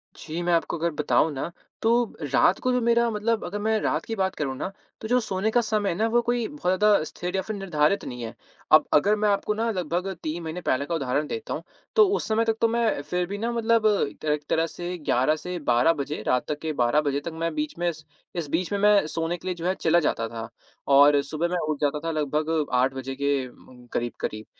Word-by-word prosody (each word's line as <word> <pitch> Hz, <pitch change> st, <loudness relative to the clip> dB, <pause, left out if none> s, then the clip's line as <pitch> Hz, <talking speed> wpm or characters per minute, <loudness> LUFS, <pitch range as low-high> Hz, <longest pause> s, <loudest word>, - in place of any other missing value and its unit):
जी, 165 Hz, +2 st, -5 dB
मैं 175 Hz, 0 st, +1 dB
आपको 170 Hz, 0 st, 0 dB
अगर 170 Hz, +1 st, 0 dB
बताऊँ 150 Hz, +1 st, +2 dB
ना 140 Hz, +5 st, -4 dB, 0.3 s
तो 225 Hz, -, +2 dB, 0.4 s
रात 180 Hz, +7 st, +4 dB
को 255 Hz, -, 0 dB
जो 250 Hz, -, +2 dB
मेरा 235 Hz, 0 st, +3 dB
मतलब 220 Hz, +1 st, 0 dB
अगर 205 Hz, +4 st, -4 dB
मैं 220 Hz, 0 st, +1 dB
रात -, -, -1 dB
की 225 Hz, -, -3 dB
बात 190 Hz, -1 st, -1 dB
करूँ, 135 Hz, -3 st, -2 dB
ना 190 Hz, -, -4 dB, 0.3 s
तो 220 Hz, -, -4 dB
जो 250 Hz, +1 st, +3 dB
सोने 210 Hz, -1 st, -1 dB
का 240 Hz, -, +3 dB
समय 215 Hz, -3 st, 0 dB
है 170 Hz, -, -1 dB
ना 220 Hz, +4 st, +1 dB
वो 240 Hz, +1 st, +3 dB
कोई 240 Hz, -1 st, 0 dB
बहुत 295 Hz, 0 st, -12 dB, 0.2 s
ज़्यादा 210 Hz, -5 st, +4 dB
स्थिर 180 Hz, +3 st, -5 dB
या 190 Hz, -, +1 dB
फ़िर 215 Hz, +2 st, -5 dB
निर्धारित 175 Hz, -1 st, +1 dB
नहीं 125 Hz, -1 st, -6 dB
है। 115 Hz, -, -6 dB, 0.4 s
अब 155 Hz, -, +7 dB
अगर 205 Hz, +8 st, +4 dB
मैं 210 Hz, 0 st, +1 dB
आपको 205 Hz, +1 st, +1 dB
ना 225 Hz, +2 st, -1 dB
लगभग 180 Hz, 0 st, -2 dB, 0.2 s
3 160 Hz, +2 st, -3 dB
महीने 160 Hz, +3 st, -5 dB
पहले 140 Hz, -3 st, 0 dB
का 170 Hz, -, -2 dB
उदाहरण 145 Hz, +1 st, -1 dB
देता 225 Hz, -1 st, -4 dB
हूँ -, -, -5 dB, 0.3 s
तो 430 Hz, -3 st, +7 dB
उस -, -, -3 dB
समय 225 Hz, +1 st, +2 dB
तक 225 Hz, -1 st, 0 dB
तो 230 Hz, -, +5 dB
मैं 230 Hz, -9 st, +1 dB
फ़िर 180 Hz, +4 st, -2 dB
भी 200 Hz, +1 st, -4 dB
ना 230 Hz, +3 st, -2 dB
मतलब 230 Hz, -1 st, +2 dB, 0.3 s
त -, -, -8 dB
एक 150 Hz, 0 st, 0 dB
तरह 165 Hz, +1 st, +2 dB
से 175 Hz, +2 st, -5 dB
11 150 Hz, -1 st, +2 dB
से 180 Hz, +3 st, -5 dB
12 120 Hz, +8 st, +4 dB
बजे 145 Hz, +1 st, -4 dB
रात 125 Hz, 0 st, +2 dB
तक 150 Hz, 0 st, -3 dB
के 160 Hz, -1 st, -2 dB
12 125 Hz, +3 st, +2 dB
बजे 140 Hz, -1 st, 0 dB
तक 170 Hz, -, -3 dB
मैं 165 Hz, +1 st, -2 dB
बीच 300 Hz, -1 st, -3 dB
में 175 Hz, 0 st, +1 dB
स 155 Hz, -1 st, -13 dB, 0.3 s
इस 170 Hz, -3 st, -3 dB
बीच 175 Hz, +5 st, -1 dB
में 200 Hz, -, 0 dB
मैं 205 Hz, -4 st, +5 dB
सोने 165 Hz, +2 st, -2 dB
के 180 Hz, -, -10 dB
लिए 180 Hz, -, -1 dB
जो 170 Hz, 0 st, -7 dB
है 185 Hz, -, +2 dB
चला 170 Hz, +1 st, +4 dB
जाता 115 Hz, -7 st, 0 dB
था 115 Hz, -1 st, -6 dB, 0.5 s
और 145 Hz, 0 st, +7 dB
सुबह 155 Hz, +4 st, -2 dB
मैं 180 Hz, +1 st, -1 dB
उठ 150 Hz, -, -1 dB
जाता 145 Hz, +1 st, +1 dB
था 165 Hz, +2 st, -3 dB
लगभग 155 Hz, +1 st, 0 dB
8 130 Hz, +2 st, +3 dB
बजे 135 Hz, 0 st, -5 dB
के 140 Hz, -1 st, 0 dB
उम 125 Hz, -, -18 dB
उम, 125 Hz, -1 st, -15 dB
करीब-करीब। 110 Hz, -2 st, -3 dB
170 Hz, 250 wpm, -25 LUFS, 150-210 Hz, 0.5 s, अब